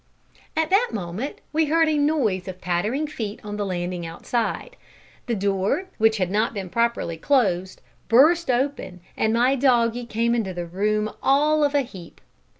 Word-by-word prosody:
At 320 +1 +1
that 430 +6 +4
moment 200 +7 -5
we 320 +1 +3
heard 325 +2 +3
a 310 - +1
noise 280 - +1
of 185 -1 -7
pattering 210 - -1
feet 225 -9 -5
on 210 0 -6
the 205 - -2
landing 175 -1 -3
outside. 230 - -3 0.5
The 235 - 0
door, 200 - -1
which 220 0 +4
had 185 -2 -1
not 215 +3 0
been 190 -3 -5
properly 235 -8 0
closed, 190 - 0 0.2
burst 310 +8 +5
open, 250 -8 -1
and 220 - +1
my 245 +4 +3
doggie 240 -3 +2
came 235 +1 0
into 205 -6 -1
the 175 -1 -4
room 210 +4 -1
all 300 +3 +3
of 290 0 +1
a 285 - +4
heap. 190 -10 -11
230 Hz, 165 wpm, -23 LUFS, 190-280 Hz, 0.5 s, burst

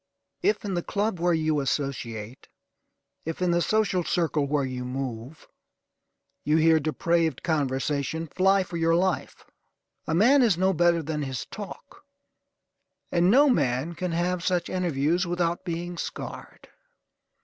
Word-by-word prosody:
If 400 - +1
in 200 - -2
the 175 - 0
club 205 0 -2
where 175 +1 +2
you 155 -1 +1
associate; 130 -5 -4 0.8
if 165 0 -5
in 180 -1 +1
the 175 0 +2
social 200 -3 +1
circle 160 -5 0
where 145 -1 0
you 130 -1 -4
move, 125 +1 -6 1.0
you 150 +2 +2
hear 160 0 +5
depraved 160 0 0
conversation, 145 +1 -1
fly 190 +4 +2
for 180 -2 -6
your 165 0 +2
life! 185 +1 -1 0.6
A 160 - 0
man 255 +10 +5
is 220 -9 +3
no 190 +1 +2
better 170 -1 +3
than 150 0 -3
his 135 -3 -4
talk; 215 +8 -10 1.1
and 175 +1 +3
no 280 +7 +6
man 145 - +1
can 180 +1 -3
have 175 +1 -1
such 180 -2 0
interviews 175 0 0
without 175 0 -1
being 175 0 -4
scarred. - - -7
170 Hz, 140 wpm, -26 LUFS, 145-180 Hz, 1.1 s, no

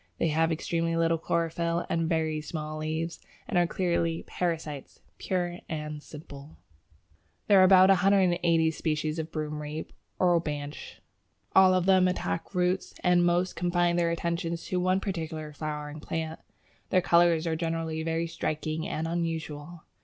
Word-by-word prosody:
They 165 - +1
have 160 +2 +2
extremely 165 +1 -1
little 165 0 +2
chlorophyll 170 +1 -1
and 165 -1 0
very 160 -2 0
small 155 0 -5
leaves, 160 +2 -3 0.3
and 230 - -4
are 175 - +3
clearly 170 -2 0
parasites 160 -5 -4 0.2
"pure 175 -1 -2
and 150 -2 -4
simple." 145 -1 -11 0.9
There 200 -2 +6
are - - +8
about 185 0 +7
180 180 -4 +3
species 155 0 -2
of 160 0 -4
Broomrape 150 0 -5 0.3
(Orobanche). 155 -5 -1 0.5
All 190 -1 +7
of 180 -1 +1
them 185 -1 +5
attack 180 0 -3
roots, 180 +1 0
and 180 -1 +4
most 175 +1 +1
confine 175 0 +1
their 170 -1 +2
attentions 170 0 -2
to 180 - -1
one 185 +1 +2
particular 160 -5 -4
flowering 150 0 -5
plant. 160 +1 -4 0.5
Their 185 - +3
colours 170 -1 +4
are 165 -1 0
generally 165 -1 -2
very 165 +1 -1
striking 155 -1 -3
and 160 +1 -2
unusual. 165 -1 -4
165 Hz, 140 wpm, -28 LUFS, 155-175 Hz, 0.9 s, are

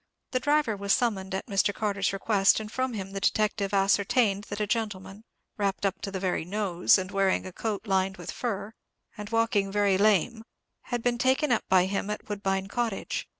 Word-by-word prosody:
The 255 - +1
driver 290 -5 +1
was 200 0 0
summoned 190 -6 0
at 190 - -4
Mr. 200 -2 +1
Carter's 200 -2 0
request, 195 0 +3
and 215 -1 -7
from 255 0 -1
him 195 -3 -5
the 195 - -4
detective 205 -1 0
ascertained 200 +1 +2
that 205 - -6
a 210 - +1
gentleman, 210 -1 -4 0.3
wrapped 200 -1 -1
up 195 -1 -1
to - - -4
the 190 -1 -4
very 185 -3 -1
nose, 185 -1 +2
and 185 0 -4
wearing 195 -1 +1
a 185 - -8
coat 215 +1 -3
lined 190 -1 0
with 175 - -6
fur, 210 -3 -4 0.4
and 210 -1 -7
walking 225 -3 +1
very 200 -2 +2
lame, 215 +2 +2 0.4
had 245 -2 -3
been 240 -1 0
taken 260 +3 +2
up 240 - +1
by 185 -1 +5
him 195 +1 -2
at 210 - -5
Woodbine 195 -2 -2
Cottage. 225 -1 -3
200 Hz, 195 wpm, -27 LUFS, 195-220 Hz, 0.4 s, by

